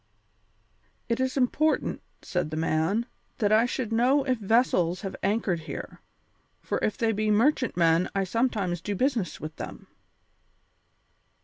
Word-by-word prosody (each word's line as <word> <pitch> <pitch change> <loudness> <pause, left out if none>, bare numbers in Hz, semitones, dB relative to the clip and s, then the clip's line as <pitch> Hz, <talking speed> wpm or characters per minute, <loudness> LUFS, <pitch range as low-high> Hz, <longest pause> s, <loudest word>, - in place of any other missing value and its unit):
"It 235 - 0
is 260 +1 -1
important," 295 +5 +1 0.2
said 180 -4 -2
the 155 - -4
man, 165 +8 +1 0.3
"that 205 -2 +1
I 220 +3 +5
should 235 -2 -3
know 255 +5 +3
if 255 -3 0
vessels 195 -5 +2
have 195 -3 -5
anchored 200 -3 0
here, 160 - -8 0.6
for - - -2
if 215 - -1
they 225 -1 +1
be 215 0 0
merchantmen 205 - +3
I 195 - +2
sometimes 195 -4 -1
do 205 - -3
business 245 -4 0
with 155 0 -7
them." - - -7
215 Hz, 135 wpm, -27 LUFS, 180-245 Hz, 0.6 s, I